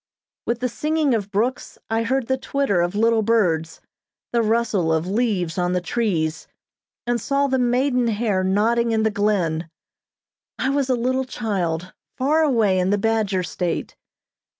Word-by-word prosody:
With 235 Hz, 0 st, -1 dB
the 250 Hz, -, +1 dB
singing 300 Hz, +3 st, 0 dB
of 205 Hz, -3 st, -1 dB
brooks, 230 Hz, +6 st, -2 dB
I 225 Hz, +1 st, 0 dB
heard 260 Hz, +2 st, 0 dB
the 260 Hz, -, +1 dB
twitter 260 Hz, -8 st, 0 dB
of 175 Hz, +3 st, -1 dB
little 225 Hz, +1 st, +3 dB
birds, 180 Hz, -8 st, +1 dB, 0.5 s
the 235 Hz, -, +3 dB
rustle 220 Hz, -6 st, +1 dB
of 160 Hz, +1 st, +1 dB
leaves 190 Hz, -5 st, -1 dB
on 180 Hz, 0 st, 0 dB
the 180 Hz, -, +1 dB
trees, 175 Hz, -6 st, -1 dB, 0.6 s
and 240 Hz, 0 st, 0 dB
saw 280 Hz, 0 st, +1 dB
the 265 Hz, -1 st, +1 dB
maiden 250 Hz, 0 st, +2 dB
hair 210 Hz, -4 st, 0 dB
nodding 225 Hz, +5 st, +2 dB
in 220 Hz, -1 st, +1 dB
the 220 Hz, -, +2 dB
glen. 180 Hz, -6 st, 0 dB, 0.9 s
I 265 Hz, -, 0 dB
was 275 Hz, -1 st, 0 dB
a 255 Hz, -, +3 dB
little 260 Hz, +2 st, 0 dB
child 185 Hz, -8 st, -3 dB, 0.2 s
far 295 Hz, +5 st, +2 dB
away 225 Hz, -11 st, +2 dB
in 180 Hz, +1 st, +1 dB
the 205 Hz, -, +2 dB
Badger 210 Hz, -3 st, 0 dB
State. 175 Hz, -1 st, -3 dB
225 Hz, 160 wpm, -22 LUFS, 185-245 Hz, 0.9 s, little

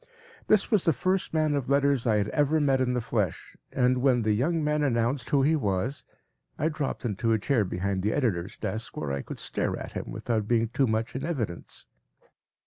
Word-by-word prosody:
This 215 Hz, +1 st, +3 dB
was 210 Hz, -5 st, +3 dB
the 165 Hz, -, +4 dB
first 185 Hz, +8 st, 0 dB
man 155 Hz, -2 st, +1 dB
of 140 Hz, -3 st, -2 dB
letters 140 Hz, -3 st, +2 dB
I 110 Hz, -2 st, +3 dB
had 105 Hz, 0 st, 0 dB
ever 150 Hz, +4 st, +2 dB
met 135 Hz, -3 st, +2 dB
in 125 Hz, -1 st, +1 dB
the 125 Hz, -, 0 dB
flesh, 105 Hz, -6 st, -2 dB, 0.2 s
and 125 Hz, -1 st, +2 dB
when 125 Hz, -3 st, +3 dB
the 110 Hz, -, +2 dB
young 155 Hz, +9 st, +1 dB
man 150 Hz, 0 st, +1 dB
announced 120 Hz, -2 st, 0 dB
who 140 Hz, -2 st, +3 dB
he 155 Hz, +3 st, +3 dB
was, 105 Hz, 0 st, -1 dB, 0.5 s
I 155 Hz, -, +1 dB
dropped 150 Hz, -5 st, -3 dB
into 115 Hz, +1 st, 0 dB
a -, -, +3 dB
chair 110 Hz, +1 st, +1 dB
behind 95 Hz, +1 st, -2 dB
the 105 Hz, +3 st, 0 dB
editor’s 100 Hz, -10 st, -1 dB
desk 115 Hz, +2 st, -4 dB
where 75 Hz, -2 st, -3 dB
I 70 Hz, 0 st, -2 dB
could -, -, -8 dB
stare -, -, -2 dB
at -, -, -7 dB
him -, -, -5 dB
without 110 Hz, -3 st, -2 dB
being 115 Hz, -1 st, +2 dB
too 135 Hz, +3 st, +1 dB
much 110 Hz, +1 st, -1 dB
in 135 Hz, -, -3 dB
evidence. 120 Hz, -, -4 dB
125 Hz, 210 wpm, -27 LUFS, 110-145 Hz, 0.5 s, the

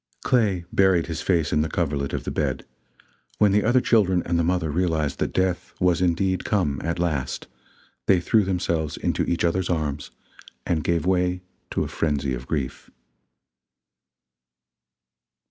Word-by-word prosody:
Clay 100 Hz, -8 st, +2 dB
buried 95 Hz, -4 st, +4 dB
his 80 Hz, -1 st, -4 dB
face 85 Hz, -5 st, +1 dB
in 75 Hz, -, +3 dB
the 80 Hz, -, -1 dB
coverlet 70 Hz, -6 st, -1 dB
of -, -, -3 dB
the -, -, -4 dB
bed; -, -, -2 dB, 0.7 s
when 105 Hz, -2 st, +4 dB
the 105 Hz, +1 st, +3 dB
other 120 Hz, +3 st, +4 dB
children 95 Hz, -7 st, +2 dB
and 85 Hz, 0 st, 0 dB
the -, -, +2 dB
mother 85 Hz, -2 st, 0 dB
realized 80 Hz, -3 st, 0 dB
that -, -, -1 dB
death 95 Hz, -1 st, -1 dB
was 90 Hz, -1 st, +2 dB
indeed 90 Hz, +1 st, +1 dB
come 85 Hz, -10 st, 0 dB
at 85 Hz, +1 st, -2 dB
last, 80 Hz, -7 st, -2 dB, 0.6 s
they 95 Hz, -2 st, +5 dB
threw 105 Hz, +5 st, +3 dB
themselves 85 Hz, -5 st, -1 dB
into -, -, -1 dB
each 85 Hz, -, -1 dB
others' 90 Hz, +2 st, 0 dB
arms 75 Hz, -4 st, -2 dB, 0.6 s
and 80 Hz, -4 st, 0 dB
gave 85 Hz, -2 st, 0 dB
way 90 Hz, 0 st, +1 dB, 0.3 s
to -, -, -1 dB
a -, -, -4 dB
frenzy 70 Hz, -4 st, -1 dB
of 60 Hz, +1 st, -6 dB
grief. 70 Hz, -5 st, -3 dB
85 Hz, 155 wpm, -24 LUFS, 80-95 Hz, 0.7 s, they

